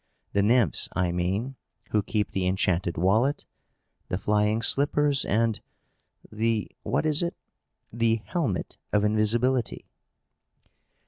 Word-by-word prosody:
The 100 - +3
Nymphs, 110 - +2
I 90 -1 0
mean, 95 +10 -2 0.3
who 105 - +2
keep 105 +1 -2
the 95 -1 -1
enchanted 90 -2 0
wallet, 110 - +1 0.6
the 90 - -2
flying 105 +2 +1
slippers, 145 +1 +2
and 115 +1 0 0.7
the 110 0 -1
what - - -1
is 155 +1 +2
it? 170 0 -2 0.6
the 115 -1 +2
helmet 130 - -2
of 105 0 +2
invisibility." 115 +4 +1
110 Hz, 115 wpm, -26 LUFS, 100-125 Hz, 0.7 s, The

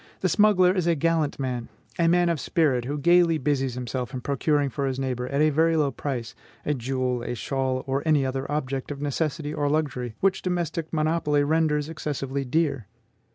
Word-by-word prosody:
The 185 - +2
smuggler 185 -2 +4
is 180 -3 0
a 170 - +3
gallant 160 -1 0
man, 125 -3 -3 0.3
a 170 - +4
man 175 +1 +4
of 165 -3 0
spirit, 140 -9 +1
who 145 +3 -3
gaily 170 +2 +4
busies 135 -3 -1
himself 125 0 -4
in 125 - -4
procuring 140 +1 0
for 140 +1 -2
his 130 -1 -2
neighbor, 125 -2 -2
at 140 +2 0
a 155 0 +4
very 160 +2 +3
low 145 -3 +2
price, 125 -3 -4 0.3
a 150 - +1
jewel, 130 -1 -2
a 120 - -4
shawl, 130 0 -2
or 135 0 -1
any 150 -4 +3
other 135 +2 -3
object 135 -3 -2
of 145 -1 -5
necessity 145 +1 -2
or 145 -1 0
luxury, 135 -6 -1
which 190 0 +1
domestic 170 -3 -2
monopoly 155 -2 +1
renders 150 -1 +1
excessively 140 -3 -3
dear." 140 - 0
145 Hz, 190 wpm, -25 LUFS, 130-160 Hz, 0.3 s, smuggler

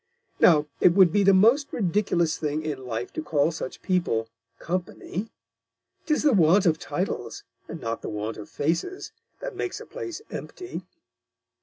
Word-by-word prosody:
Now, 150 -4 +6
it 175 - +5
would 190 -4 +7
be 205 - +4
the 195 0 +6
most 230 +9 +4
ridiculous 180 -5 +1
Thing 155 0 -2
in 140 -4 -4
Life 115 0 -4
to - - -3
call 155 0 +1
such 155 -5 -7
People 170 - 0 0.3
Company. 185 +3 -4 0.8
'Tis 305 -2 +2
the 295 -3 +5
Want 185 +1 +5
of 160 -3 +3
Titles, - - -3 0.2
and - - -7
not 115 0 -3
the - - -5
Want 105 +1 -4
of 105 - -9
Faces, 165 - -2 0.3
that - - -5
makes 375 - -3
a - - -9
Place 435 -4 -7
empty.'" 365 0 -6
170 Hz, 160 wpm, -26 LUFS, 150-210 Hz, 0.8 s, would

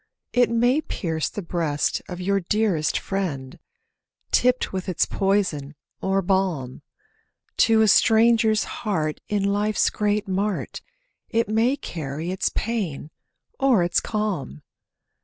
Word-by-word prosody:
It 245 0 +4
may 245 +5 +2
pierce 160 - -3
the 205 - -6
breast 165 -4 -1
of 180 -1 -6
your 195 +2 +1
dearest 195 -4 0
friend, 150 -10 -4 0.7
Tipped 250 -3 +2
with 185 0 -3
its 180 - +1
poison 185 -8 -1 0.3
or 195 0 +1
balm; 175 -9 -1 0.8
To 225 -1 +4
a - - +4
stranger's 220 +1 +4
heart 160 -9 -3
in 205 -1 0
life's 205 +2 +1
great 210 -1 0
mart, 195 +2 -2 0.5
It 230 -1 +1
may 230 +6 +2
carry 160 - -5
its 190 - 0
pain 185 -10 -3 0.5
or 250 -9 +4
its 175 0 +2
calm. 195 - -3
195 Hz, 120 wpm, -24 LUFS, 170-220 Hz, 0.8 s, It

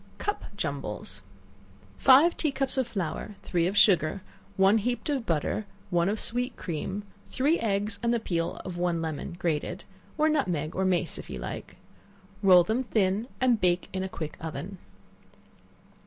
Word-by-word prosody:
Cup 410 - -2
Jumbles. - - -3 0.8
Five 280 +6 +7
tea 305 - 0
cups 270 -1 -1
of 260 -3 +1
flour, 195 -1 -4
three 170 -1 +1
of 195 +3 -2
sugar, 185 -2 +4 0.3
one 195 +3 +5
heaped 245 +7 -2
of 265 -5 -2
butter, 170 +6 0 0.2
one 175 +1 +3
of 210 +1 -1
sweet 245 +2 -1
cream, 185 +4 -4 0.2
three 290 +6 +1
eggs 205 -1 0
and 235 -1 +1
the 235 - +2
peel 170 -6 -2
of 180 -2 -5
one 175 -1 +1
lemon 160 +1 -4
grated, 175 +3 -2 0.3
or 310 0 +4
nutmeg, 180 - 0
or 190 - +1
mace 180 -3 +1
if - - -10
you - - -5
like; - - -7 0.6
roll 185 -3 +7
them 220 +8 0
thin, 215 -2 +1
and 245 -4 +3
bake 180 0 +2
in 190 - -1
a 190 - -3
quick 155 -4 -6
oven. 175 +4 -6
195 Hz, 160 wpm, -28 LUFS, 175-240 Hz, 0.8 s, Five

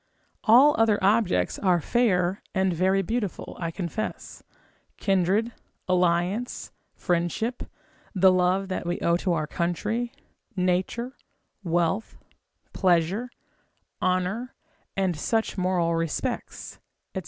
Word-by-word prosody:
All 255 +7 +7
other 220 -2 +4
objects 195 - +2
are 180 -3 +3
fair, 185 -2 +1
and 190 -1 +2
very 190 +3 +2
beautiful, 220 -1 -3
I 170 -2 -2
confess; 185 +6 -5 0.6
kindred, 195 +4 +1 0.4
alliance, 180 +5 0 0.2
friendship, 175 +7 -1 0.5
the 190 0 +6
love 185 +1 +2
that 185 -2 -3
we 175 - -1
owe 170 - +3
to 180 0 0
our 155 -2 0
country, 210 +9 -2 0.4
nature, 185 +7 -1 0.5
wealth, 175 +4 0 0.6
pleasure, 185 +6 +1 0.7
honour, 185 +7 -1 0.4
and 190 -3 +1
such 225 +9 -1
moral 180 -3 +1
respects, 165 -1 -3 0.3
&c. - - -2
185 Hz, 105 wpm, -26 LUFS, 175-215 Hz, 0.7 s, All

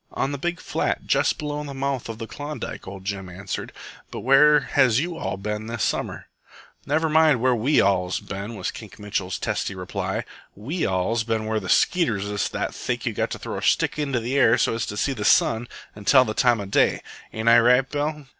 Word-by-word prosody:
"On 135 - -1
the 140 - -4
big 175 +3 -2
flat - - -2
jest - - +2
below 150 0 -4
the 140 -2 -7
mouth 135 -3 -2
of 115 - -5
Klondike," 145 0 -7
ol' 95 0 -8
Jim 95 -1 -5
answered. 95 +3 -6 0.4
"But - - -7
where 150 +4 +6
has 130 -4 +3
you 170 +3 -2
all 130 - -4
ben 105 +2 -4
this 115 -3 -3
summer?" - - -2 0.6
"Never 155 +3 +1
you 155 - -3
mind 155 -5 +5
where 130 +2 +3
we 125 +6 +2
all's 95 -2 +1
ben," 100 +4 -6
was - - -3
Kink 110 -3 -11
Mitchell's 100 -3 -3
testy 100 - -2
reply. 90 -1 -3 0.3
"We 145 - -2
all's 95 +5 0
ben 110 -1 -2
where 110 0 0
the 95 - -7
skeeters 115 - +2
is 105 0 -2
that - - -3
thick - - -3
you've - - -2
got - - 0
to - - -5
throw - - -5
a - - -9
stick - - +1
into 140 -4 0
the 125 +5 -1
air 125 -2 +5
so - - +1
as 115 0 -2
to 105 - -5
see 135 - 0
the 110 -5 -5
sun 115 +3 +3 0.3
and 105 -1 -12
tell 130 -2 +6
the 110 - -3
time 120 -1 +3
of 100 -1 -6
day. - - +2 0.3
Ain't 110 +1 -4
I 120 0 +8
right, 125 +3 +4
Bill?" 150 +1 -3
115 Hz, 220 wpm, -24 LUFS, 105-140 Hz, 0.6 s, I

